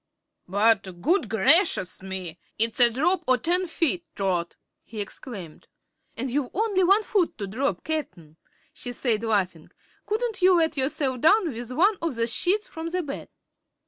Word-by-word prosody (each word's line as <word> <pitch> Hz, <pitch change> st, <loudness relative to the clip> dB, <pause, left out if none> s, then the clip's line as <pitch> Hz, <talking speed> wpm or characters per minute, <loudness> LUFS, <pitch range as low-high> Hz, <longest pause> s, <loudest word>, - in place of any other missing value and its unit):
"But 195 Hz, -2 st, +1 dB
good 345 Hz, -, +1 dB
gracious 245 Hz, -, +3 dB
me! 185 Hz, -3 st, -6 dB, 0.2 s
It's 230 Hz, +3 st, +1 dB
a 240 Hz, -1 st, +9 dB
drop 330 Hz, +10 st, 0 dB
o' 255 Hz, -, +5 dB
ten 360 Hz, +8 st, 0 dB
feet, 335 Hz, +1 st, 0 dB
Trot," 180 Hz, -3 st, -1 dB, 0.3 s
he 225 Hz, -, -9 dB
exclaimed. 200 Hz, -4 st, -8 dB, 0.5 s
"And 255 Hz, -, -2 dB
you've 275 Hz, -1 st, -1 dB
only 405 Hz, -2 st, +1 dB
one 395 Hz, +4 st, +4 dB
foot 395 Hz, -5 st, 0 dB
to 200 Hz, -, -4 dB
drop, 250 Hz, +9 st, -2 dB
Cap'n," 180 Hz, -, -5 dB, 0.4 s
she 245 Hz, -, -6 dB
said, 230 Hz, -3 st, 0 dB
laughing. 185 Hz, -7 st, -1 dB, 0.4 s
"Couldn't 445 Hz, 0 st, -2 dB
you 365 Hz, 0 st, +5 dB
let 325 Hz, -2 st, +1 dB
yourself 265 Hz, -2 st, -1 dB
down 360 Hz, -, +4 dB
with 240 Hz, +1 st, -7 dB
one 385 Hz, +10 st, +3 dB
of 330 Hz, -6 st, -2 dB
the 230 Hz, 0 st, +1 dB
sheets 360 Hz, -, 0 dB
from 325 Hz, 0 st, -7 dB
the 360 Hz, +1 st, -2 dB
bed?" 275 Hz, -2 st, -7 dB
260 Hz, 160 wpm, -25 LUFS, 210-350 Hz, 0.5 s, a